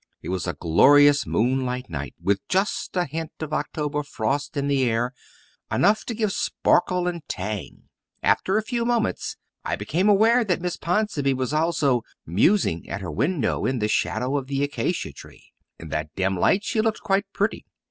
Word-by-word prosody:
It - - -6
was 90 -1 -2
a 85 - -1
glorious 145 - +5
moonlight 125 +1 0
night, 70 -5 -6
with 100 0 +1
just 190 0 0
a 180 - +2
hint 160 +2 -5
of 155 -1 -5
October 150 -1 -2
frost 145 +3 -2
in 140 0 0
the 140 -2 +2
air 120 +2 0 0.6
enough 215 +2 +3
to 235 - -4
give 215 -2 0
sparkle 180 0 +1
and 175 -1 -3
tang. 100 +1 -5 0.4
After 190 +3 +2
a 220 - 0
few 235 +1 -2
moments 235 -1 -1 0.3
I - - -1
became 185 +6 0
aware 225 +4 +5
that 185 -5 0
Miss 175 0 -2
Ponsonby 170 -7 0
was 130 +2 -2
also 150 -6 +2 0.2
"musing" 90 - +2
at - - -4
her - - -5
window 140 - 0
in 130 0 0
the 105 -2 0
shadow 125 +5 0
of 135 -2 -4
the 140 0 -1
acacia 145 +5 -2
tree. - - -15 0.2
In 80 - -10
that 75 +1 -3
dim 95 0 0
light 190 - +2
she 235 -5 0
looked 220 0 -1
quite 195 +1 +1
pretty. 205 +3 -1
145 Hz, 180 wpm, -24 LUFS, 125-190 Hz, 0.6 s, glorious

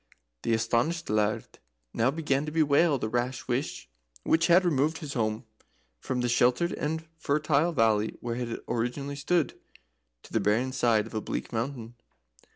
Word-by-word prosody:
The 115 - 0
astonished 120 +7 0
Laird 105 0 -1 0.3
now 115 +3 +2
began 145 -1 -1
to - - -3
bewail 155 0 +3
the 110 - -2
rash 120 +2 -2
wish 130 +4 -2 0.4
which 165 0 +3
had 180 +2 +5
removed 155 0 +2
his 150 -3 -6
home 110 -2 -1 0.5
from 125 - -2
the 120 - +1
sheltered 125 +7 +2
and 160 +2 -3
fertile 150 +2 +2
valley 110 -6 +2
where 120 -1 -3
it 120 -2 -4
originally 130 +5 -2
stood 145 0 0 0.6
to - - -15
the - - +3
barren 115 +5 +1
side 120 -5 +2
of - - -11
a 110 - -2
bleak - - -5
mountain. 115 0 -3
130 Hz, 160 wpm, -28 LUFS, 115-150 Hz, 0.6 s, had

